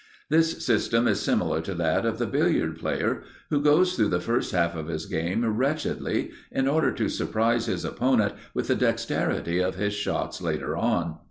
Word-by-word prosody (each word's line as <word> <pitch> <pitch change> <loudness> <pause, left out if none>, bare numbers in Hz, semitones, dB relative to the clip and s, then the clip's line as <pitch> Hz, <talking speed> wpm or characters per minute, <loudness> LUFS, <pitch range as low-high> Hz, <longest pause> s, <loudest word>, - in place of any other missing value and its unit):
This 165 +1 +2
system 115 0 +2
is - - +2
similar 80 - +1
to 95 +3 -5
that 85 +6 +1
of 115 0 -1
the 120 - 0
billiard 110 - +1
player - - -1 0.3
who 145 -1 +2
goes 160 +5 +4
through 110 -3 +3
the 90 - +1
first 115 +6 -1
half 85 -1 +1
of 80 -1 -5
his 80 -1 -4
game 90 +7 -1
wretchedly 130 +8 -1 0.2
in 135 - 0
order 155 +3 +3
to - - -1
surprise 115 +1 0
his - - -2
opponent 120 -5 +1 0.2
with - - -1
the - - +3
dexterity 85 +1 0
of 90 0 0
his 105 +2 -1
shots 105 0 -2
later - - -2
on. 85 -2 0
110 Hz, 180 wpm, -26 LUFS, 85-130 Hz, 0.3 s, goes